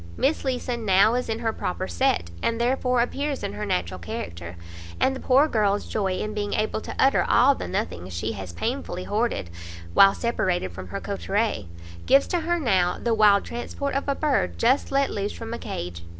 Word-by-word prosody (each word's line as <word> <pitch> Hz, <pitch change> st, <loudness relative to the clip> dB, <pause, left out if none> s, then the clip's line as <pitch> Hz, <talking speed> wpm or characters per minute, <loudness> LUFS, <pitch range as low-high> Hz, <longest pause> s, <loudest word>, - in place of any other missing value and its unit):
Miss 290 Hz, +4 st, +1 dB
Leeson 250 Hz, -3 st, -2 dB
now 200 Hz, +2 st, +5 dB
is 250 Hz, -1 st, -1 dB
in 225 Hz, -, -1 dB
her 225 Hz, -1 st, -1 dB
proper 180 Hz, -, -3 dB
set, 85 Hz, -1 st, 0 dB
and 230 Hz, 0 st, 0 dB
therefore 250 Hz, 0 st, +1 dB
appears 280 Hz, +3 st, -3 dB
in -, -, -3 dB
her 105 Hz, -, -4 dB
natural 90 Hz, +1 st, -1 dB
character; 85 Hz, 0 st, -6 dB, 0.4 s
and 265 Hz, -, +2 dB
the -, -, -6 dB
poor 275 Hz, +4 st, +4 dB
girl's 205 Hz, -5 st, +1 dB
joy 195 Hz, -4 st, -1 dB
in 215 Hz, +3 st, -3 dB
being 205 Hz, -1 st, -2 dB
able 215 Hz, 0 st, -1 dB
to -, -, -7 dB
utter 270 Hz, -, +4 dB
all 255 Hz, +4 st, +6 dB
the -, -, -6 dB
nothings 90 Hz, +1 st, -3 dB
she 90 Hz, +6 st, -3 dB
has 95 Hz, -4 st, -7 dB
painfully 225 Hz, -, -3 dB
hoarded 210 Hz, -, -1 dB, 0.4 s
while 195 Hz, -, +7 dB
separated 185 Hz, -, -1 dB
from 95 Hz, +1 st, -8 dB
her -, -, -5 dB
coterie, 200 Hz, -, -2 dB, 0.4 s
gives 275 Hz, 0 st, +5 dB
to 355 Hz, -, +1 dB
her 345 Hz, +2 st, 0 dB
now 190 Hz, -, +2 dB
the 235 Hz, -, 0 dB
wild 210 Hz, -2 st, +5 dB
transport 275 Hz, +4 st, -4 dB
of 275 Hz, +1 st, -2 dB
a 280 Hz, -, +1 dB
bird 295 Hz, -3 st, 0 dB
just 255 Hz, +5 st, +2 dB
let 275 Hz, 0 st, +2 dB
loose 205 Hz, 0 st, -2 dB
from 230 Hz, 0 st, -7 dB
a 235 Hz, -, -4 dB
cage. 85 Hz, 0 st, -5 dB
215 Hz, 195 wpm, -25 LUFS, -, 0.4 s, while